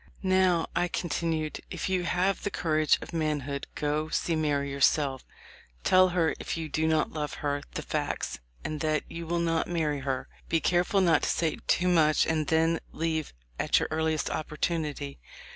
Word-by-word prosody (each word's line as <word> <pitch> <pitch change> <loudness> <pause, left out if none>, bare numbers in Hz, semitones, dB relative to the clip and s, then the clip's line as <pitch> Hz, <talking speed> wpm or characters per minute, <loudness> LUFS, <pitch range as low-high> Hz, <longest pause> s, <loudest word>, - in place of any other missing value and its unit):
'Now,' 185 -3 +3
I 175 +1 +2
continued, 160 -2 -2
'if - - -3
you 185 -2 0
have 185 +3 +1
the - - -1
courage 155 -5 +2
of - - -10
manhood, 145 -3 -2
go 150 +1 -1
see 165 +1 0
Mary 145 -3 0
yourself; 140 -1 +2 0.6
tell 185 0 +6
her, 175 -3 +2
if - - -3
you 160 -1 -4
do 160 +2 0
not 160 -1 +2
love 150 -1 -3
her, 145 0 0
the - - -3
facts, - - -2 0.2
and 155 - -3
that 155 -1 0
you 165 0 -7
will 170 +1 0
not 165 -1 +1
marry 155 -4 0
her. 135 -1 -2 0.2
Be 165 - +3
careful 180 +4 +2
not 170 -4 +4
to - - 0
say 160 -2 0
too 180 - +3
much, 160 -4 +4
and 155 -2 0
then 165 +1 +2
leave 160 -2 -2 0.3
at - - +3
your - - +1
earliest 160 0 0
opportunity.' 155 - -2
160 Hz, 175 wpm, -28 LUFS, 150-170 Hz, 0.6 s, tell